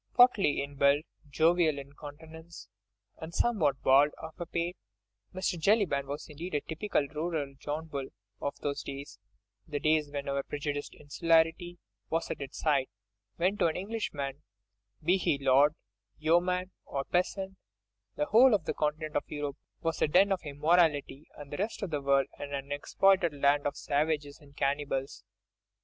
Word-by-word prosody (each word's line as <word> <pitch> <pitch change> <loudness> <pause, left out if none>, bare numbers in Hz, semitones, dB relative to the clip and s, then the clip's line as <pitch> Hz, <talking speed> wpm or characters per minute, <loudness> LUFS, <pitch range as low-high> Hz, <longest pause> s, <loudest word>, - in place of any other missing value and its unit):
Portly 235 - +5
in 140 0 -9
build, 140 +2 +4 0.3
jovial 160 +1 +3
in 140 0 -9
countenance 160 +3 -11 0.5
and 160 +1 -8
somewhat 160 - +1
bald 140 +3 +6
of 160 0 -8 0.2
pate, 170 +2 -1 0.6
Mr. 185 -1 -2
Jellyband 165 -7 +2
was 145 +2 -5
indeed 160 +3 -6
a 145 - +1
typical 160 -3 -1
rural 155 -2 -3
John 150 +2 -4
Bull 140 -4 -5 0.3
of 140 - -2
those 140 -1 -2
days—the 115 - -9
days 155 -1 +2
when 140 -1 -5
our 140 0 0
prejudiced 145 0 -4
insularity 165 +3 +1 0.3
was 165 +1 -1
at - - -5
its 140 0 -7
height, 140 -4 +2 0.5
when 185 +4 +1
to 170 - +4
an 160 - -1
Englishman, 150 -9 -4 0.6
be 180 +5 +4
he 160 -6 +1
lord, 140 +2 +4 0.4
yeoman, 180 +4 +1
or 140 -1 -3
peasant, 190 +3 -1 0.6
the 150 - 0
whole 230 - +6
of 165 - -2
the - - -1
continent 155 0 -2
of - - -1
Europe 145 -1 -4 0.2
was 165 -1 -2
a - - +4
den 190 +6 +4
of 190 - +1
immorality, 150 -1 +1
and 145 -1 -10
the - - -3
rest 210 +2 -3
of 185 - -3
the 145 -2 -1
world 140 0 +3
an 145 0 -4
unexploited 150 +6 +2
land 145 +1 +3
of 145 - -4
savages 145 0 -1
and 145 -2 -19
cannibals. 140 -1 -1
150 Hz, 155 wpm, -30 LUFS, 140-170 Hz, 0.6 s, bald